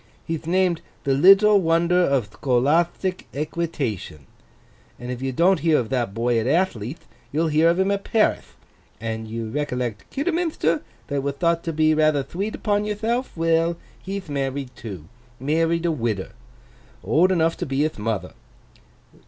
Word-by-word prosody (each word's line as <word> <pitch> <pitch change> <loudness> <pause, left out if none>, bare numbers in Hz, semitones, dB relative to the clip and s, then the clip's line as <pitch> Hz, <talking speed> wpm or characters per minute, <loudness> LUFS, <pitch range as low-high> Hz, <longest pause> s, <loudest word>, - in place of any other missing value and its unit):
He'th 165 -1 -4
named 180 -1 +2 0.2
The 135 - +1
Little 195 +7 +6
Wonder 170 +1 +3
of 135 - +1
Thcolathtic 160 - +1
Equitation; 140 - -3 0.7
and 125 +1 -6
if 125 0 -5
you 135 0 -1
don't 175 +7 +3
hear 160 0 +3
of 115 - -2
that 125 -5 -1
boy 120 0 +1
at 115 - -2
Athley'th, 145 - -1 0.3
you'll 160 +3 +1
hear 155 +2 +4
of 170 - +2
him 190 +1 +2
at 200 0 -1
Parith. 220 -2 0 0.4
And 110 -1 -4
you 115 0 -4
recollect 125 -6 -3
Kidderminthter, 310 - 0 0.2
that 140 -1 -2
wath 140 0 -3
thought 170 +2 +1
to 165 - -1
be 155 0 +3
rather 155 -2 +3
thweet 195 +10 -4
upon 205 -1 0
yourthelf? 225 +2 -2
Well. 165 +1 +2 0.2
He'th 195 -1 -5
married 135 -2 -3
too. 95 -9 -8 0.3
Married 165 +5 +1
a 170 - +2
widder. 115 -9 -2 0.7
Old 155 - +3
enough 165 -2 +2
to - - -4
be 135 +1 0
hith 155 -7 -2
mother. 110 -1 -3
155 Hz, 155 wpm, -23 LUFS, 125-175 Hz, 0.7 s, Little